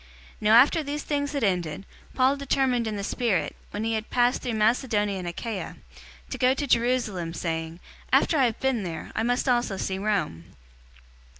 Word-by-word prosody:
019:021 -, -, -27 dB
Now 215 Hz, +1 st, +5 dB
after 280 Hz, +7 st, +6 dB
these 295 Hz, 0 st, -4 dB
things 285 Hz, -1 st, -2 dB
had 280 Hz, -4 st, -1 dB
ended, 180 Hz, -3 st, -1 dB, 0.3 s
Paul 260 Hz, +2 st, +3 dB
determined 265 Hz, -4 st, 0 dB
in 215 Hz, -, -3 dB
the 200 Hz, -, -4 dB
spirit, 210 Hz, -5 st, -1 dB
when 210 Hz, -, -4 dB
he 225 Hz, 0 st, 0 dB
had 220 Hz, 0 st, -3 dB
passed 245 Hz, +1 st, +2 dB
through 240 Hz, -3 st, -3 dB
Macedonia 215 Hz, -3 st, +1 dB
and 180 Hz, -, -5 dB
Achaia, 190 Hz, +2 st, -5 dB, 0.6 s
to -, -, -3 dB
go 255 Hz, +1 st, +4 dB
to 285 Hz, -, -2 dB
Jerusalem, 230 Hz, -9 st, 0 dB
saying, 165 Hz, 0 st, -3 dB, 0.3 s
"After -, -, +4 dB
I 265 Hz, -, +5 dB
have 230 Hz, -3 st, -1 dB
been 265 Hz, -4 st, 0 dB
there, 165 Hz, -4 st, -6 dB
I -, -, 0 dB
must 245 Hz, +4 st, 0 dB
also 240 Hz, -5 st, +1 dB
see 190 Hz, 0 st, -3 dB
Rome." 190 Hz, -, -2 dB
225 Hz, 185 wpm, -26 LUFS, 190-255 Hz, 0.6 s, after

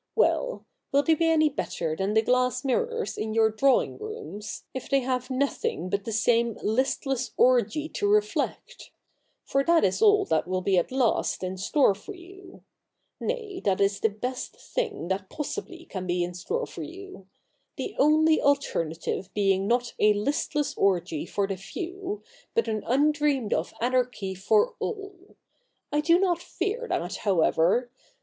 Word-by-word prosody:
Well -, -, +1 dB
— -, -, -55 dB
will 280 Hz, +1 st, +4 dB
they 320 Hz, -, +4 dB
be 330 Hz, +1 st, +2 dB
any 315 Hz, -1 st, +4 dB
better 170 Hz, -, -3 dB
than 195 Hz, +5 st, -1 dB
the 220 Hz, -, +4 dB
glass 255 Hz, +2 st, +1 dB
mirrors 465 Hz, -, -1 dB
in 220 Hz, 0 st, -3 dB
your 220 Hz, -1 st, +4 dB
drawing 265 Hz, +5 st, +2 dB
rooms, 430 Hz, -, -7 dB
if 260 Hz, -, -6 dB
they 275 Hz, -1 st, +3 dB
have 255 Hz, 0 st, -2 dB
nothing 255 Hz, -, -1 dB
but 200 Hz, 0 st, -1 dB
the 225 Hz, -, -3 dB
same 230 Hz, +1 st, +2 dB
Ustless 260 Hz, +2 st, -1 dB
orgy 255 Hz, +5 st, +3 dB
to 410 Hz, -, -1 dB
reflect? 425 Hz, +1 st, -1 dB, 0.5 s
For 275 Hz, 0 st, +1 dB
that 335 Hz, +2 st, +4 dB
is 190 Hz, -, +1 dB
all 415 Hz, -2 st, +5 dB
that -, -, 0 dB
will 185 Hz, 0 st, -1 dB
be 190 Hz, -2 st, +3 dB
at 175 Hz, -, -3 dB
last 255 Hz, -7 st, +1 dB
in 185 Hz, 0 st, -3 dB
store 200 Hz, +5 st, +3 dB
for 305 Hz, -, -10 dB
you; 370 Hz, +1 st, -14 dB, 0.6 s
nay, 440 Hz, -6 st, -3 dB
that 195 Hz, -2 st, 0 dB
is 200 Hz, 0 st, +2 dB
the 220 Hz, -, +2 dB
best 250 Hz, +5 st, -5 dB
thing 470 Hz, -, -3 dB
that 190 Hz, 0 st, -2 dB
possibly 340 Hz, +2 st, -6 dB
can 185 Hz, -2 st, -6 dB
be 175 Hz, 0 st, +1 dB
in 175 Hz, +1 st, -4 dB
store 460 Hz, -, -3 dB
for -, -, -9 dB
you; 375 Hz, -, -10 dB, 0.5 s
the 415 Hz, -, -5 dB
only 310 Hz, +2 st, +4 dB
alternative 185 Hz, -, -1 dB
being 195 Hz, -1 st, +2 dB
not 240 Hz, +1 st, +1 dB
a 210 Hz, 0 st, +5 dB
listless 285 Hz, +6 st, -1 dB
orgy 175 Hz, -4 st, +1 dB
for 200 Hz, +3 st, 0 dB
the 195 Hz, -1 st, -4 dB
few, 375 Hz, -, -6 dB, 0.3 s
but 460 Hz, -, +2 dB
an 215 Hz, -1 st, -1 dB
undreamed 290 Hz, -2 st, +2 dB
of -, -, -1 dB
anarchy 245 Hz, -5 st, 0 dB
for 430 Hz, -, +2 dB
all. 400 Hz, -3 st, -6 dB, 0.6 s
I 295 Hz, -, +2 dB
do 335 Hz, +3 st, +5 dB
not 355 Hz, -3 st, +1 dB
fear 425 Hz, +9 st, -3 dB
that, 175 Hz, +3 st, -2 dB
however. 190 Hz, +5 st, +2 dB
255 Hz, 165 wpm, -27 LUFS, -, 0.6 s, all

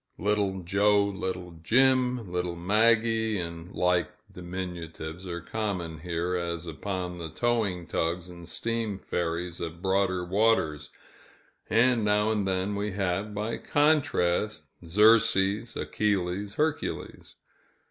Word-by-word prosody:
"Little 100 Hz, -2 st, 0 dB
Joe," 100 Hz, +3 st, +3 dB
"Little 90 Hz, -3 st, -4 dB
Jim," 125 Hz, -1 st, +3 dB
"Little 90 Hz, -1 st, -2 dB
Maggie," 110 Hz, +4 st, +2 dB
and 85 Hz, +1 st, -6 dB
like 90 Hz, -2 st, +1 dB, 0.2 s
diminutives, 90 Hz, -1 st, -6 dB
are 85 Hz, -1 st, -4 dB
common 90 Hz, -5 st, -3 dB
here, 85 Hz, +2 st, -2 dB
as 85 Hz, -1 st, -3 dB
upon 90 Hz, +1 st, -4 dB
the 80 Hz, -1 st, -5 dB
towing 105 Hz, -2 st, 0 dB
tugs 85 Hz, +2 st, -1 dB
and 85 Hz, -1 st, -10 dB
steam 115 Hz, -3 st, -2 dB
ferries 85 Hz, -1 st, -3 dB
of 85 Hz, 0 st, -5 dB
broader 95 Hz, -1 st, +1 dB
waters 90 Hz, -7 st, +1 dB, 0.8 s
and 115 Hz, +2 st, +4 dB
now 105 Hz, +1 st, +2 dB
and 105 Hz, -3 st, 0 dB
then 95 Hz, +2 st, 0 dB
we 100 Hz, 0 st, -2 dB
have, 100 Hz, +2 st, -1 dB
by 105 Hz, +3 st, -2 dB
contrast, 110 Hz, -, +1 dB
"Xerxes," 105 Hz, +3 st, +4 dB
"Achilles," 100 Hz, 0 st, -1 dB
"Hercules." 155 Hz, 0 st, -2 dB
95 Hz, 115 wpm, -28 LUFS, 85-110 Hz, 0.8 s, and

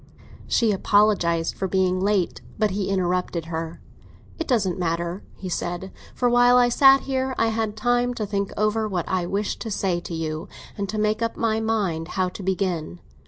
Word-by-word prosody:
She 230 Hz, -2 st, +2 dB
apologised 195 Hz, -5 st, +2 dB
for 190 Hz, -, -3 dB
being 185 Hz, -1 st, +1 dB
late; 195 Hz, -2 st, 0 dB, 0.2 s
but 215 Hz, -2 st, +1 dB
he 195 Hz, 0 st, -2 dB
interrupted 180 Hz, -3 st, 0 dB
her. 165 Hz, 0 st, -5 dB, 0.6 s
"It 330 Hz, -, -3 dB
doesn't 195 Hz, -8 st, +1 dB
matter," 170 Hz, +2 st, -2 dB
he 190 Hz, -, -7 dB
said; 175 Hz, +1 st, -3 dB, 0.2 s
"for 245 Hz, -, +1 dB
while 245 Hz, +1 st, +5 dB
I 245 Hz, -1 st, +5 dB
sat 270 Hz, +2 st, +6 dB
here 265 Hz, -1 st, -2 dB
I 225 Hz, -, +2 dB
had 220 Hz, -1 st, -2 dB
time 245 Hz, +2 st, +1 dB
to 215 Hz, -, -2 dB
think 200 Hz, -1 st, -2 dB
over 215 Hz, +1 st, +1 dB
what 180 Hz, -5 st, -2 dB
I 180 Hz, -2 st, -1 dB
wish 200 Hz, +2 st, -2 dB
to 225 Hz, -, -5 dB
say 190 Hz, -4 st, 0 dB
to 175 Hz, -1 st, -6 dB
you, 155 Hz, -1 st, -4 dB, 0.3 s
and 200 Hz, -1 st, -3 dB
to 215 Hz, -, -3 dB
make 215 Hz, +1 st, +1 dB
up 230 Hz, 0 st, -1 dB
my 220 Hz, -1 st, +1 dB
mind 200 Hz, -8 st, -1 dB
how 185 Hz, -1 st, +2 dB
to 180 Hz, -, -9 dB
begin." 180 Hz, -, -2 dB
200 Hz, 185 wpm, -24 LUFS, 175-225 Hz, 0.6 s, sat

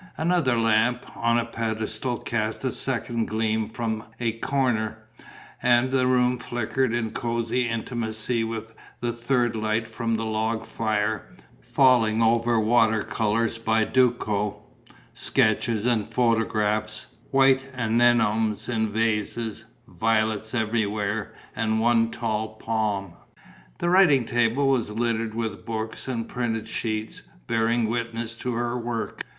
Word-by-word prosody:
Another 160 Hz, -7 st, +2 dB
lamp, 115 Hz, +2 st, +2 dB
on 115 Hz, 0 st, +2 dB
a 120 Hz, -, +1 dB
pedestal, 110 Hz, +2 st, -3 dB
cast 110 Hz, +1 st, -2 dB
a 130 Hz, -, 0 dB
second 120 Hz, -3 st, -2 dB
gleam 110 Hz, 0 st, 0 dB
from 110 Hz, -1 st, -3 dB, 0.2 s
a 120 Hz, -2 st, +1 dB
corner; 115 Hz, -2 st, 0 dB, 0.6 s
and 120 Hz, +1 st, +3 dB
the 130 Hz, -1 st, +2 dB
room 125 Hz, -1 st, +2 dB
flickered 120 Hz, +2 st, -1 dB
in 115 Hz, -2 st, -1 dB
cosy 115 Hz, +1 st, -1 dB
intimacy 115 Hz, 0 st, -2 dB
with 115 Hz, 0 st, -5 dB, 0.3 s
the 120 Hz, -1 st, -2 dB
third 120 Hz, 0 st, 0 dB
light 110 Hz, +1 st, -1 dB
from 115 Hz, 0 st, -2 dB
the 115 Hz, -, -3 dB
log 110 Hz, +1 st, -1 dB
fire, 110 Hz, -1 st, -1 dB, 0.3 s
falling 115 Hz, -, +3 dB
over 115 Hz, 0 st, +3 dB
water 110 Hz, -1 st, +3 dB
colours 115 Hz, +1 st, 0 dB
by 110 Hz, -1 st, +2 dB
Duco, 105 Hz, -4 st, +1 dB, 0.5 s
sketches 110 Hz, 0 st, +1 dB
and 115 Hz, -4 st, +1 dB
photographs, 110 Hz, -2 st, 0 dB, 0.2 s
white 135 Hz, -1 st, +4 dB
anenomes 115 Hz, -2 st, +2 dB
in 110 Hz, -3 st, 0 dB
vases, 110 Hz, 0 st, -1 dB, 0.2 s
violets 110 Hz, 0 st, 0 dB
everywhere 110 Hz, -2 st, -1 dB, 0.2 s
and 110 Hz, 0 st, 0 dB
one 115 Hz, 0 st, +3 dB
tall 110 Hz, -2 st, -3 dB
palm. 105 Hz, -5 st, -2 dB, 0.6 s
The 175 Hz, -, 0 dB
writing 165 Hz, -10 st, +5 dB
table 120 Hz, +4 st, +2 dB
was 130 Hz, -5 st, +1 dB
littered 115 Hz, 0 st, -1 dB
with 110 Hz, -1 st, -3 dB
books 110 Hz, +1 st, -4 dB
and 115 Hz, -3 st, -3 dB
printed 115 Hz, -3 st, -2 dB
sheets, 110 Hz, -1 st, -3 dB, 0.2 s
bearing 115 Hz, -, +1 dB
witness 115 Hz, 0 st, -3 dB
to 125 Hz, +1 st, -3 dB
her 120 Hz, +1 st, -1 dB
work. 120 Hz, -1 st, -4 dB
115 Hz, 125 wpm, -25 LUFS, 110-120 Hz, 0.6 s, writing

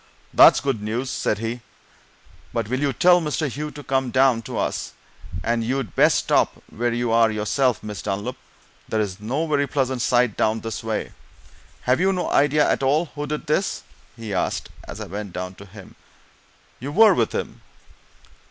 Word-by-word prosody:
"That's -, -, +7 dB
good 135 Hz, -6 st, -1 dB
news!" 115 Hz, +5 st, -3 dB
said 105 Hz, -, -1 dB
he. 115 Hz, +3 st, -4 dB, 0.9 s
"But 115 Hz, -2 st, -1 dB
will 130 Hz, +1 st, -1 dB
you 145 Hz, -1 st, +1 dB
tell 175 Hz, +7 st, +5 dB
Mr. 155 Hz, 0 st, -1 dB
Hugh 150 Hz, +4 st, -4 dB
to 150 Hz, -1 st, -10 dB
come 130 Hz, -1 st, 0 dB
down 130 Hz, -2 st, +3 dB
to -, -, -4 dB
us? -, -, -2 dB, 0.5 s
and 115 Hz, -1 st, 0 dB
you'd 125 Hz, -3 st, -2 dB
best -, -, +5 dB
stop -, -, +2 dB, 0.2 s
where 120 Hz, +2 st, -1 dB
you 120 Hz, 0 st, -1 dB
are 115 Hz, 0 st, +5 dB
yourself, 110 Hz, +4 st, 0 dB
Miss 105 Hz, -1 st, -6 dB
Dunlop 100 Hz, +1 st, -3 dB, 0.5 s
there's 105 Hz, -3 st, -1 dB
no 130 Hz, +10 st, -2 dB
very 145 Hz, -2 st, +1 dB
pleasant 130 Hz, -3 st, -1 dB
sight 120 Hz, -3 st, +2 dB
down 110 Hz, +1 st, +1 dB
this 115 Hz, -1 st, -5 dB
way. 110 Hz, -1 st, -3 dB, 0.7 s
Have 125 Hz, +4 st, +2 dB
you 190 Hz, +2 st, +3 dB
no 180 Hz, -2 st, -2 dB
idea 145 Hz, +1 st, +3 dB
at -, -, +1 dB
all 145 Hz, +5 st, +1 dB
who 145 Hz, 0 st, -4 dB
did 150 Hz, +1 st, -4 dB
this?" 170 Hz, +6 st, -1 dB, 0.3 s
he 115 Hz, -3 st, -6 dB
asked, 90 Hz, -, -2 dB, 0.2 s
as -, -, -8 dB
I -, -, -5 dB
went 100 Hz, 0 st, -6 dB
down 90 Hz, 0 st, -5 dB
to 100 Hz, +2 st, -13 dB
him. 100 Hz, 0 st, -13 dB, 0.9 s
"You 135 Hz, +4 st, -5 dB
were 215 Hz, +5 st, +6 dB
with 115 Hz, -9 st, +1 dB
him?" -, -, -4 dB
125 Hz, 180 wpm, -23 LUFS, 110-145 Hz, 0.9 s, That's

